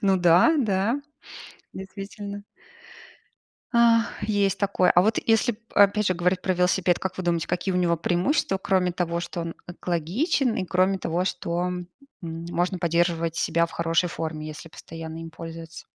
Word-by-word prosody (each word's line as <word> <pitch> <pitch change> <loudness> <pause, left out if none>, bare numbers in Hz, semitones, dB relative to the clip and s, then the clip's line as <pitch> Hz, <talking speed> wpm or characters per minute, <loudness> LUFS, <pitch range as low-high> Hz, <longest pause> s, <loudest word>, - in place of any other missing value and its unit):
Ну 195 -1 +4
да, 180 - +5
да, 220 +3 +1 0.7
действительно. 200 +1 -8 1.3
Ах, 235 -1 +3
есть 205 -2 +1
такое. 200 -2 +2
А 175 - +5
вот 215 +2 +2
если 225 0 +2 0.2
опять 205 +1 +4
же 185 - +2
говорить 180 +1 +1
про 185 - +1
велосипед. 180 0 +2
Как 185 -1 -4
вы 185 - -3
думаете, 170 -1 0
какие 180 +2 -1
у 180 - +2
него 170 -1 +2
преимущества, 190 - 0
кроме 185 -2 +1
того, 170 -1 -2
что 175 0 -5
он 165 0 -5
экологичен 190 - -1
и 185 - -1
кроме 185 +2 +1
того, 175 0 -1
что, 170 -2 -2
м, 180 -1 -4 0.4
можно 170 +2 -2
поддерживать 170 -1 0
себя 170 0 +1
в - - -16
хорошей 170 +1 +1
форме, 155 -2 -5
если 155 +1 -8
постоянно 165 0 -9
им 165 - -8
пользоваться. 165 0 -9
180 Hz, 160 wpm, -25 LUFS, 170-195 Hz, 1.3 s, да